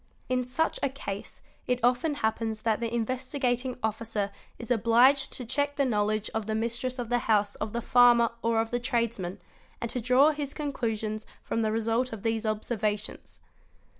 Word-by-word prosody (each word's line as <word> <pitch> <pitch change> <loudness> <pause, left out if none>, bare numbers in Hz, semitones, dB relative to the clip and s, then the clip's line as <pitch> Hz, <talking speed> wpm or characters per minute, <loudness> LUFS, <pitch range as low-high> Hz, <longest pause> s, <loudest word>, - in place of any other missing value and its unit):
In 255 0 +1
such 255 +6 -1
a 275 - +1
case 205 -7 -7 0.2
it 250 0 +1
often 250 +5 +2
happens 220 -3 -1
that 220 -2 +1
the 230 -1 -2
Investigating 250 +1 -1
Officer 220 -2 -2 0.3
is 235 0 -6
obliged 245 +4 +4
to 250 - -5
check 285 +4 0
the 280 - +2
knowledge 215 -2 0
of 220 -1 -2
the 220 - -1
mistress 235 +3 -2
of 240 -2 -4
the 245 0 +2
house 205 -2 +3
of 215 0 -3
the 235 +1 -3
farmer 240 -1 +5
| 235 - -34
or 230 -1 +2
of 225 0 -1
the 245 - 0
tradesman, 230 -7 -1 0.4
and 235 - -3
to 250 - -2
draw 255 +6 +5
his 290 -2 -4
conclusions 225 -7 -3 0.2
from 230 - -1
the 220 -1 +1
result 230 +3 0
of 215 - -7
these 225 0 0
observations. 215 -1 -3
235 Hz, 180 wpm, -28 LUFS, 220-250 Hz, 0.4 s, farmer